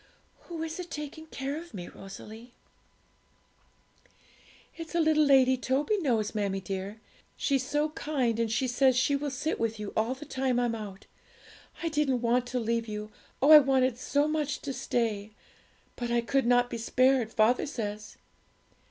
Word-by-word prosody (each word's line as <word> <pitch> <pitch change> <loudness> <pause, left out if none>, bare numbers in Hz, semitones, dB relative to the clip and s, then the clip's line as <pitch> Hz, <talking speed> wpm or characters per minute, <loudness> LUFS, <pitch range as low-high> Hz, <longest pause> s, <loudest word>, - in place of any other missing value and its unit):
'Who 330 -2 -5
is 325 +2 -5
it 355 -1 -6
taking 300 +1 -7
care 280 -1 -4
of 335 -6 -9
me, 175 -2 -6
Rosalie?' 220 +5 -11 2.2
'It's 330 0 -8
a - - +3
little 310 -1 +4
lady 260 -2 +5
Toby 270 - 0
knows, 230 - 0
mammie 200 -3 -1
dear; 195 +2 -5 0.4
she's 275 -2 +1
so 295 +3 0
kind, 265 -7 -1
and 230 -1 0
she 255 +4 +1
says 255 +1 +3
she 280 +3 +3
will 285 +1 -2
sit 275 +4 -2
with 225 -1 -1
you 210 -1 -5
all 225 +4 0
the 285 +3 -10
time 260 -3 0
I'm 240 -1 +1
out. 205 -3 -7 0.8
I 330 - 0
didn't 295 -5 +1
want 245 +1 +1
to 250 0 -2
leave 230 0 -1
you 210 0 -6 0.3
oh, 290 - +6
I 305 - +12
wanted 265 -3 +2
so 285 +4 0
much 300 -2 -1
to 275 - -4
stay! 215 -5 -2 0.6
but 240 -1 -4
I 235 0 +2
could 265 +2 0
not 245 0 +3
be 235 - -4
spared, 255 0 +2
father 225 +6 +2
says.' 210 -6 -5
255 Hz, 170 wpm, -29 LUFS, 225-285 Hz, 2.2 s, I